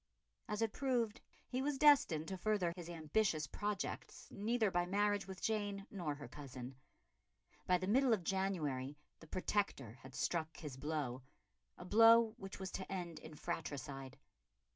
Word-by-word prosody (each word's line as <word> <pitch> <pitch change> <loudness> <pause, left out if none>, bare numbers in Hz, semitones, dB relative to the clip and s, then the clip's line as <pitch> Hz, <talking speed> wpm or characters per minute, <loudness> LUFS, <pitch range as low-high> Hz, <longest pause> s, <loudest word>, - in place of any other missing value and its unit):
As 210 +1 -1
it 220 - 0
proved 245 -5 0 0.3
he 255 +1 -1
was 285 0 0
destined 265 - +5
to 190 - -3
further 190 -4 +1
his 175 -2 -7
ambitious 160 0 +1
projects 205 +4 -4
neither 220 0 +1
by 175 -1 +1
marriage 205 +1 +1
with 190 -1 -8
Jane 205 -2 -1
nor 170 -7 -2
her 145 0 -8
cousin. 130 -3 -8 0.9
By 180 - +5
the 185 - -3
middle 250 +6 +4
of 210 -6 +3
January 155 -8 -1 0.2
the 160 - -13
Protector 155 - -1
had 130 0 -11
struck 160 -2 -1
his 150 -6 -6
blow 140 -3 -2 0.6
a 180 - -9
blow 225 +2 +7
which 195 -2 -7
was 190 -1 -4
to 190 - -5
end 175 -4 -4
in 155 - -10
fratricide. 140 -5 -5
185 Hz, 155 wpm, -38 LUFS, 155-210 Hz, 0.9 s, blow